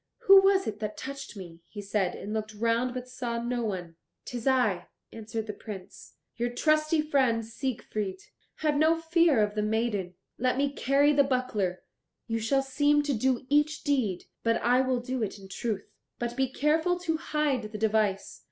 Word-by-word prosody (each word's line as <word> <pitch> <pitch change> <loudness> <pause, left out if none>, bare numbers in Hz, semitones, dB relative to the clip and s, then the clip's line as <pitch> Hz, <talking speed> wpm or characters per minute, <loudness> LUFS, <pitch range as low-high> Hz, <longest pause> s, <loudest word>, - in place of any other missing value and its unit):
"Who 390 0 +8
was 390 0 +4
it 210 -1 -4
that 210 -1 -4
touched 275 -4 -7
me?" 170 -3 -10
he 210 - -9
said, 195 -2 -1
and 210 - -6
looked 215 0 -3
round, 230 +3 +1
but 250 0 -5
saw 245 -2 -3
no 240 0 -2
one. 180 -6 -4 0.3
"'Tis 245 0 -5
I," 245 -9 +2 0.3
answered 220 0 -5
the 210 - -5
Prince, 200 -3 -10 0.2
"your 240 +1 0
trusty 305 +4 +2
friend, 260 -7 +2
Siegfried. 215 -5 -4 0.4
Have 300 -2 0
no 320 +2 +4
fear 330 -7 +3
of 210 0 -1
the 210 - -1
maiden. 210 -4 -1 0.2
Let 255 +2 +1
me 280 0 +1
carry 280 +2 +3
the 285 -1 +5
buckler; 240 -9 -1 0.4
you 225 0 -2
shall 270 +5 +1
seem 290 +2 +2
to 290 -1 0
do 255 +2 0
each 295 +2 +2
deed, 240 -11 0 0.2
but 230 0 +2
I 250 +2 +4
will 255 -2 0
do 255 0 -3
it 210 -1 -2
in 195 -1 -12
truth. 205 +1 -4 0.3
But 240 0 -3
be 265 0 +1
careful 320 +6 +2
to 325 -3 0
hide 285 -8 -1
the 215 - -5
device. 210 -2 0
240 Hz, 180 wpm, -28 LUFS, 215-280 Hz, 0.4 s, Who